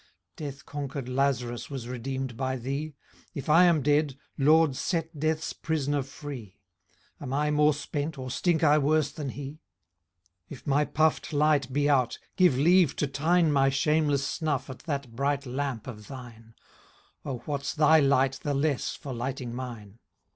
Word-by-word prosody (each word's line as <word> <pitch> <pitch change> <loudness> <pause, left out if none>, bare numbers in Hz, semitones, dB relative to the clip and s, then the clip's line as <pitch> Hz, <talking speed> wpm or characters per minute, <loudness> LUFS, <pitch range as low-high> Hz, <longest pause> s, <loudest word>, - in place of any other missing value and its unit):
Death 140 -3 -7
conquer'd 140 -2 -5
Laz 135 -1 +1
rus 120 0 -6
was 135 -4 -6
redeem'd 130 0 -4
by 130 +1 -2
thee; 140 +4 -4 0.4
If 140 +2 -5
I 165 +4 +7
am 165 -5 +3
dead, 145 -1 +2 0.2
LORD, 155 0 +4
set 165 0 -2
death's 155 +1 -1
pris'ner 145 -3 -1
free; 135 -6 -9 0.6
Am 135 -3 -6
I 150 +2 +1
more 150 0 +4
spent, 145 +1 -4
or 130 -1 -5
stink 165 +3 +1
I 150 0 +5
worse 150 0 +2
than 145 -2 -5
he? 145 +3 -7 0.9
If 135 - -10
my 145 +1 +2
puff'd 155 +1 +1
life 145 -3 +2
be 145 +2 +1
out, 130 -4 +2 0.2
give 180 -9 +4
leave 170 +1 +4
to - - 0
tine 160 +4 +2
My 135 -1 +4
shameless 145 0 +1
snuff 150 -5 -2
at 130 - -10
that 140 -5 -3
bright 140 +2 0
lamp 130 -3 -3
of 105 -5 -9
thine; 115 -4 -11 0.7
O 130 - -4
what's 140 0 -3
thy 160 0 +6
light 135 -1 +2
the 145 -1 -1
less 140 -1 0
for 135 - -7
light'ning 125 0 -4
mine? 120 -4 -7
140 Hz, 160 wpm, -28 LUFS, 130-150 Hz, 0.9 s, I